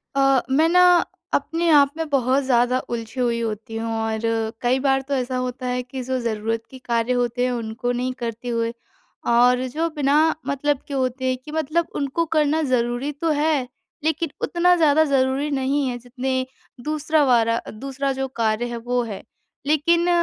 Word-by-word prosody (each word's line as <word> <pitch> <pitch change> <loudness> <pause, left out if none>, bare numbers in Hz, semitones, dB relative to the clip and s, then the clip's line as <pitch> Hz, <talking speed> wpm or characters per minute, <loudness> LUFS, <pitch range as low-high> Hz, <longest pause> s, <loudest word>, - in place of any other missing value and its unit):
अ, 270 -2 +4
मैं 305 +5 +4
ना 360 +1 +5 0.5
अपने 330 +4 0
आप 285 -3 +6
में 325 -1 -2
बहुत 270 0 +2
ज़्यादा 250 -1 +2
उलझी 235 +1 -5
हुई 235 -2 +1
होती 225 0 -4
हूँ 225 0 -3
और 220 0 -1 0.4
कई 250 +2 +2
बार 270 0 +2
तो 285 - -2
ऐसा 255 -1 -1
होता 255 0 -3
है 250 0 -1
कि 255 +1 -7
जो 260 +1 -2
ज़रूरत 225 -1 -2
के 260 - -10
कार्य 235 +1 +1
होते 245 0 0
हैं 250 - 0
उनको 240 +1 -3
नहीं 250 +1 -2
करते 235 +1 -5
हुए 230 0 -1 0.5
और 245 +2 +4
जो 325 +5 -1
बिना 285 -1 +2 0.3
मतलब 280 0 0
के 285 - -6
होते 260 -1 -1
हैं, 255 0 +1
कि 255 +4 -12
मतलब 315 +2 0
उनको 285 +4 -1
करना 305 +1 +3
ज़रूरी 245 +3 0
तो 315 +3 -2
है 300 -5 +1 0.4
लेकिन 320 +1 0
उतना 355 +1 +3
ज़्यादा 315 -2 +4
ज़रूरी 275 +1 +1
नहीं 275 +1 0
है, 245 -1 -3
जितने 255 +2 -3 0.4
दूसरा 305 0 +1
वाला 230 -2 +3
दूसरा 275 +4 -3
जो 265 0 -2
कार्य 220 +1 +1
है 240 - -4
वो 245 +2 -1
है। 210 -4 -6 0.4
लेकिन 335 +4 +2
260 Hz, 180 wpm, -22 LUFS, 240-290 Hz, 0.5 s, आप